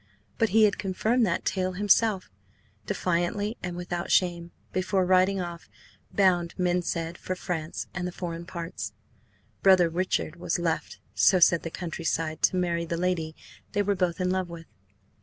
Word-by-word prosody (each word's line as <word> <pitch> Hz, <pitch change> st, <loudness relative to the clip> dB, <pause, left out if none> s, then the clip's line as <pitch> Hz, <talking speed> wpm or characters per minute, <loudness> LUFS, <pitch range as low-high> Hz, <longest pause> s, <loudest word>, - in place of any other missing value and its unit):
But 225 Hz, -, +3 dB
he 220 Hz, +3 st, +5 dB
had 210 Hz, -1 st, +3 dB
confirmed 220 Hz, +5 st, +1 dB
that -, -, -1 dB
tale 185 Hz, -1 st, 0 dB
himself, 205 Hz, -, +2 dB, 0.6 s
defiantly 185 Hz, +5 st, 0 dB
and 180 Hz, -1 st, -4 dB
without 175 Hz, -1 st, -4 dB
shame, 175 Hz, -2 st, +2 dB, 0.2 s
before 185 Hz, 0 st, +1 dB
riding 185 Hz, +1 st, +3 dB
off, 175 Hz, -1 st, -6 dB, 0.4 s
bound, 175 Hz, -3 st, +2 dB
men 180 Hz, -1 st, +1 dB
said, 170 Hz, -1 st, -3 dB
for 185 Hz, -, -3 dB
France 170 Hz, -3 st, -4 dB
and 180 Hz, 0 st, -3 dB
the -, -, -4 dB
foreign 170 Hz, -1 st, -6 dB
parts. 170 Hz, -1 st, -5 dB, 0.7 s
Brother 185 Hz, -3 st, +6 dB
Richard 175 Hz, -1 st, -1 dB
was 175 Hz, -, -1 dB
left, 170 Hz, -2 st, -2 dB, 0.2 s
so 190 Hz, -, +5 dB
said 170 Hz, -1 st, +5 dB
the 165 Hz, -, -5 dB
countryside, 165 Hz, -2 st, -3 dB
to -, -, +3 dB
marry 170 Hz, -2 st, 0 dB
the 170 Hz, 0 st, -3 dB
lady 170 Hz, -3 st, -1 dB, 0.4 s
they 205 Hz, 0 st, +2 dB
were 205 Hz, 0 st, +1 dB
both 180 Hz, -2 st, -1 dB
in 180 Hz, 0 st, +1 dB
love 185 Hz, -1 st, -1 dB
with. 170 Hz, -1 st, -9 dB
180 Hz, 160 wpm, -27 LUFS, 170-185 Hz, 0.7 s, Brother